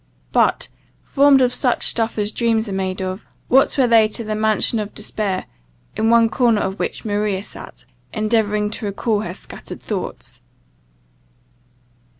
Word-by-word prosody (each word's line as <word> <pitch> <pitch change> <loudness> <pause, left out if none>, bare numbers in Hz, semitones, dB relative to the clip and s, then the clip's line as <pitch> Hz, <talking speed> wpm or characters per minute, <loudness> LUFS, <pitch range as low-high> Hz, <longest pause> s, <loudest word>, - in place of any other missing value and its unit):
But, - - +2 0.4
formed 280 -1 +4
of 250 0 +1
such 250 -3 +1
stuff 225 -1 0
as 210 0 0
dreams 225 -1 0
are - - -5
made 190 0 -2
of, 185 +2 -5 0.2
what 270 +3 +4
were 265 - +4
they 225 -2 +5
to 230 +2 -5
the 215 0 -3
mansion 220 +1 +1
of 210 -1 -5
despair, 205 -3 -2 0.5
in 220 - +1
one 230 0 +5
corner 230 -2 +2
of 190 +1 -3
which - - -3
Maria 205 -2 -1
sat, - - -11 0.3
endeavouring 210 -1 0
to 215 - -5
recall 205 +2 -1
her 180 -3 -5
scattered - - -9
thoughts! - - -6
215 Hz, 155 wpm, -20 LUFS, 205-230 Hz, 0.5 s, they